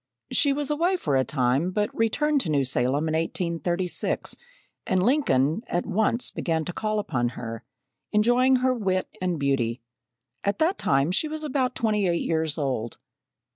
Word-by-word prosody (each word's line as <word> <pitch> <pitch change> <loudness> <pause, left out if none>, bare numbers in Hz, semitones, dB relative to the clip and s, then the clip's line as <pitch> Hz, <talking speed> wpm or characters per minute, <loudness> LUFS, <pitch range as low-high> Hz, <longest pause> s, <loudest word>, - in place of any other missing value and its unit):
She 285 - +3
was 290 +1 -1
away 345 +5 +1
for 145 - -1
a 130 - +3
time, 130 +5 +1
but 210 +2 -1
returned 285 +6 +1
to 170 - -3
New 140 -3 +2
Salem 130 +4 0
in 155 - -1
1836, 170 +2 -1 0.5
and 185 -1 +2
Lincoln 185 - +2
at 175 - -1
once 220 +4 0
began 160 -2 -1
to 180 - -4
call 215 +2 -1
upon 125 -12 0
her, 115 -1 -6 0.5
enjoying 245 +5 +4
her 255 0 +3
wit 190 -6 -1
and 180 -2 0
beauty. 130 -4 0 0.6
At 200 - 0
that 335 +5 +1
time 135 +4 +2
she 215 +11 0
was 310 0 -4
about 260 -3 -1
twenty 210 -3 +1
eight 170 -1 0
years 160 -2 0
old. 130 -6 -2
180 Hz, 165 wpm, -25 LUFS, -, 0.6 s, enjoying